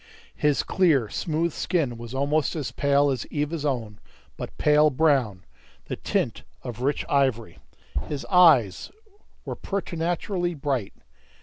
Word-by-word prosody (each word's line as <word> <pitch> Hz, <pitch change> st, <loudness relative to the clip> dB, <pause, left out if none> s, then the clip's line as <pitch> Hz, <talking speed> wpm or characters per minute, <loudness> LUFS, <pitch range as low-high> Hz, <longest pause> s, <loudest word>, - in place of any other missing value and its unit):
His 150 Hz, -2 st, +1 dB
clear, 150 Hz, -, +2 dB
smooth 165 Hz, +4 st, -1 dB
skin 160 Hz, -10 st, -1 dB
was 120 Hz, +2 st, -8 dB
almost 145 Hz, +4 st, +1 dB
as 150 Hz, -5 st, -3 dB
pale 140 Hz, 0 st, +2 dB
as 130 Hz, -, -3 dB
Eva's 150 Hz, +1 st, -2 dB
own, 115 Hz, -7 st, -2 dB, 0.4 s
but -, -, -8 dB
pale 150 Hz, 0 st, +4 dB
brown, 130 Hz, -, +1 dB, 0.4 s
the -, -, -4 dB
tint -, -, -2 dB, 0.2 s
of 120 Hz, -1 st, -7 dB
rich 140 Hz, +2 st, 0 dB
ivory. 130 Hz, -5 st, 0 dB, 0.5 s
His 145 Hz, -2 st, -4 dB
eyes 155 Hz, -, +4 dB, 0.6 s
were -, -, -4 dB
preternaturally 175 Hz, -1 st, -2 dB
bright. 135 Hz, -7 st, -2 dB
145 Hz, 125 wpm, -25 LUFS, 125-160 Hz, 0.6 s, pale